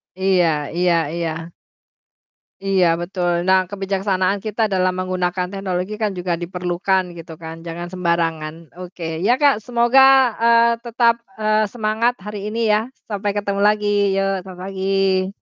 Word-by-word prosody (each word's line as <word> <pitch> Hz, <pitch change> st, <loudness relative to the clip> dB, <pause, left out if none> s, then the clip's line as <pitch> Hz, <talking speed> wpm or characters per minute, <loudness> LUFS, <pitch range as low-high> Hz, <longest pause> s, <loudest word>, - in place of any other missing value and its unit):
Iya 190 Hz, -2 st, +2 dB, 0.3 s
iya 180 Hz, -1 st, +3 dB, 0.2 s
iya. 165 Hz, 0 st, -4 dB, 1.1 s
Iya 190 Hz, -2 st, +3 dB, 0.2 s
betul. 175 Hz, 0 st, -1 dB, 0.2 s
Nah 190 Hz, 0 st, +5 dB
kebijaksanaan 195 Hz, 0 st, -1 dB
kita 215 Hz, +1 st, -3 dB
dalam 185 Hz, 0 st, +2 dB
menggunakan 180 Hz, -1 st, -1 dB
teknologi 190 Hz, 0 st, -3 dB
kan 210 Hz, -2 st, +1 dB
juga 175 Hz, -1 st, -1 dB
diperlukan 180 Hz, +1 st, -1 dB
gitu 165 Hz, 0 st, -9 dB
kan, 160 Hz, 0 st, -6 dB
jangan 170 Hz, +1 st, -5 dB
sembarangan. 165 Hz, -3 st, -1 dB, 0.3 s
Oke. 175 Hz, -1 st, -10 dB, 0.2 s
Ya, 240 Hz, -, +5 dB
Kak, 285 Hz, -4 st, +5 dB
semoga, 240 Hz, +2 st, +4 dB, 0.4 s
eee, 235 Hz, 0 st, +5 dB
tetap, 235 Hz, 0 st, +2 dB, 0.2 s
eee, 215 Hz, 0 st, +2 dB
semangat 225 Hz, +1 st, 0 dB
hari 210 Hz, -1 st, -5 dB
ini 230 Hz, -, -3 dB
ya. 210 Hz, -, +4 dB, 0.3 s
Sampai 205 Hz, -1 st, -2 dB
ketemu 200 Hz, -1 st, -2 dB
lagi, 205 Hz, -1 st, +2 dB
yuk 195 Hz, -1 st, 0 dB
selamat 185 Hz, -2 st, -11 dB
pagi. 195 Hz, 0 st, 0 dB
190 Hz, 135 wpm, -20 LUFS, 180-210 Hz, 1.1 s, Nah